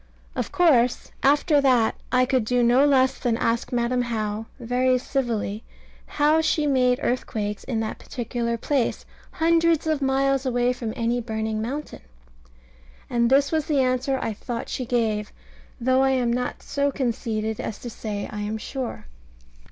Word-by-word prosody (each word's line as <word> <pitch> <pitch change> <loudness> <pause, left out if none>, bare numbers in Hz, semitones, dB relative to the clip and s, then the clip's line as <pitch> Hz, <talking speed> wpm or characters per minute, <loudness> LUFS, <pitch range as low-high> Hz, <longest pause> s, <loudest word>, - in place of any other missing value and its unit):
Of - - -3
course 255 -9 +3
after 290 +2 +4
that 250 -5 +3 0.2
I 255 0 +4
could 255 -2 +1
do 245 +2 +1
no 245 +3 +5
less 265 -2 +3
than 235 -3 0
ask 230 0 -1
Madam 245 +1 +1
How, 220 -2 -3
very 250 +1 +2
civilly, 235 -5 -2 0.4
how 305 +2 +3
she 310 -1 +1
made 255 -3 +3
earthquakes 210 -4 -2
in 225 -3 -1
that 220 - -4
particular 235 -1 -3
place, 265 +1 -1 0.3
hundreds 330 -1 +2
of 310 -2 0
miles 270 0 +2
away 245 -1 +1
from 235 -3 -4
any 235 +1 0
burning 220 -1 -3
mountain? 275 +7 -5 1.1
And 235 -1 +2
this 280 +2 +4
was 315 -2 0
the 290 -3 +2
answer 255 +1 +1
I 225 - -2
thought 230 +3 -5
she 255 - -4
gave, 220 -4 0 0.5
though 260 +2 +3
I 270 - +3
am 240 -2 +1
not 250 0 -3
so 280 0 0
conceited 220 -4 -2
as 210 - -4
to 240 - -7
say 210 -2 -5
I 210 -1 -5
am 210 +1 -3
sure. 255 +3 -5
245 Hz, 160 wpm, -24 LUFS, 230-270 Hz, 1.1 s, no